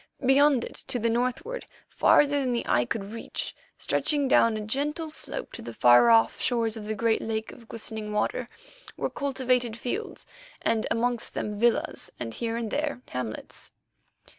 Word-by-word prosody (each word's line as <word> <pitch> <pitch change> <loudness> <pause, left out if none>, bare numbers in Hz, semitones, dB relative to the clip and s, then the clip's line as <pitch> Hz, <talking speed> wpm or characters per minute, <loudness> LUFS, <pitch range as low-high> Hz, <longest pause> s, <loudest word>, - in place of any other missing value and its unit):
Beyond 270 -1 +5
it - - -7
to - - 0
the 230 0 +1
northward, 255 - -2 0.2
farther 290 0 +4
than 255 -3 0
the 235 - -1
eye 120 0 +3
could 200 - -4
reach, 230 - -5 0.2
stretching 290 -2 +1
down 230 -4 +4
a - - -4
gentle 295 +8 -2
slope - - -4
to - - -8
the 115 - -8
far 120 -1 +6
off 115 0 +4
shores 230 -3 +1
of 220 -2 -7
the 215 +1 -2
great 230 0 +1
lake 220 0 -3
of 230 - -15
glistening 220 -2 -5
water, 210 +3 -1 0.5
were - - -2
cultivated 255 -4 0
fields, 395 - -4 0.4
and 220 -1 +1
amongst 240 0 0
them 210 -1 -3
villas 235 0 +1
and, 115 -2 -4
here 230 -1 -2
and 230 -3 -3
there, 290 -4 -2
hamlets. 125 -4 -5
230 Hz, 165 wpm, -27 LUFS, 215-265 Hz, 0.5 s, far